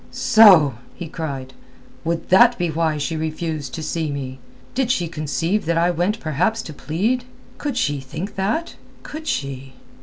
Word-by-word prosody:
"So!" 165 - +6 0.2
he 175 - -6
cried. 140 -5 -5 0.5
"Would 165 0 -2
that 240 +6 +6
be 175 -2 0
why 160 -1 0
she 150 +2 -2
refused 155 -3 -3
to 160 - -5
see 160 0 -2
me? 130 -2 -5 0.3
Did 255 -1 0
she 180 -9 +1
conceive 160 +5 -1
that 165 +1 +1
I 170 +1 +3
went 180 +6 0
perhaps 180 +8 0
to 155 - -8
plead? 210 - -1 0.3
Could 285 -4 -3
she 145 - 0
think 160 +9 -6
that? 215 - -2 0.3
Could 315 +1 -8
she?" 135 -1 -3
165 Hz, 160 wpm, -21 LUFS, 145-205 Hz, 0.5 s, So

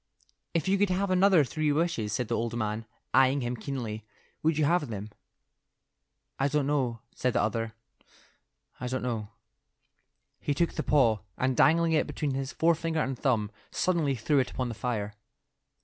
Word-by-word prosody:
"If 165 - +1
you 195 +1 +3
could 205 -1 +3
have 185 +1 0
another 185 -3 +5
three 155 +2 0
wishes," 145 -9 0
said 125 +2 -1
the - - -2
old 115 +1 -2
man, 110 0 -2 0.3
eyeing 135 +1 +4
him 120 0 -2
keenly, 110 -3 -5 0.4
"would 160 -1 +2
you 155 - +3
have 165 -1 +2
them?" 105 -1 -6 1.3
"I 135 - +3
don't 145 0 +1
know," 130 -6 0
said 125 -1 0
the - - +2
other. 115 +1 -2 1.0
"I 125 - -3
don't 130 +1 -2
know." 115 -4 -2 1.1
He 145 - -1
took 170 +3 +1
the - - -2
paw, 120 -8 +3 0.2
and 130 0 +1
dangling 165 +4 +4
it 160 - +2
between 145 -3 -2
his 135 0 -3
forefinger 165 0 +1
and 135 -2 -1
thumb, 115 -6 0 0.2
suddenly 165 -7 +1
threw 135 +5 +2
it 130 - +1
upon 125 -1 -3
the - - -4
fire. 110 -2 -3
135 Hz, 170 wpm, -29 LUFS, 115-160 Hz, 1.3 s, another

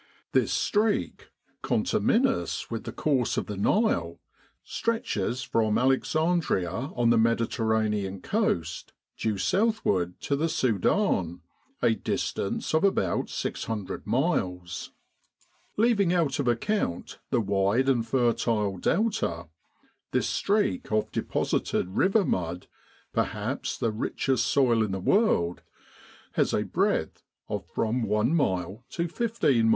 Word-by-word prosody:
This - - +2
streak, 210 - 0 0.3
conterminous 85 +5 +1
with 115 - -4
the - - -4
course 135 -6 0
of - - 0
the 105 - -5
Nile, 100 - +1 0.4
stretches 130 - -2
from 110 -2 +1
Alexandria 135 - +1 0.2
on 120 -1 +3
the 115 - +4
Mediterranean 110 -3 0
coast 90 - -1 0.2
due 110 -2 -1
southward 100 - +1
to 140 - 0
the 160 +4 0
Sudan, 100 - +1 0.4
a 115 - +5
distance 100 +1 -2
of 160 - +3
about 100 - +1
600 105 -4 -4
miles. 95 - -1 0.9
Leaving 210 -5 +3
out 155 -7 +1
of 140 - 0
account 120 - -1
the - - +2
wide 100 +4 +1
and 120 -4 +2
fertile 115 -5 +1
Delta, 165 - 0 0.6
this - - +2
streak 200 - 0
of 110 0 0
deposited 90 - -1
river 195 - +2
mud, 90 0 -2 0.5
perhaps - - -2
the 115 - 0
richest 120 +3 0
soil 130 -4 +3
in 100 -3 -2
the 95 - -2
world, 90 - +2 0.7
has - - +1
a - - +1
breadth - - 0 0.3
of - - -4
from 115 +3 -1
one 105 +5 +1
mile 95 - 0
to 170 0 -2
fifteen 170 - +1
miles. - - +4
115 Hz, 120 wpm, -27 LUFS, 95-160 Hz, 0.9 s, a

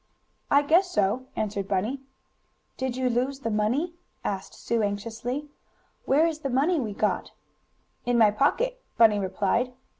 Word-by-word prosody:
"I 285 +1 +5
guess 345 +6 +4
so," 210 - 0
answered 205 -2 -2
Bunny. 210 +8 -1 0.7
"Did 260 -1 -3
you 260 -1 +1
lose 255 +3 0
the 230 - -2
money?" 240 +11 0 0.3
asked 195 -1 -4
Sue 235 -1 -1
anxiously. 225 +7 -3 0.6
"Where 295 +5 +4
is 320 -2 -1
the 275 - -3
money 295 +7 +2
we 225 -6 -2
got?" 210 +1 -1 0.7
"In 245 0 +1
my 220 -3 +6
pocket," - - +1 0.2
Bunny 215 -3 +6
replied. 205 +6 0
245 Hz, 145 wpm, -26 LUFS, 210-280 Hz, 0.7 s, my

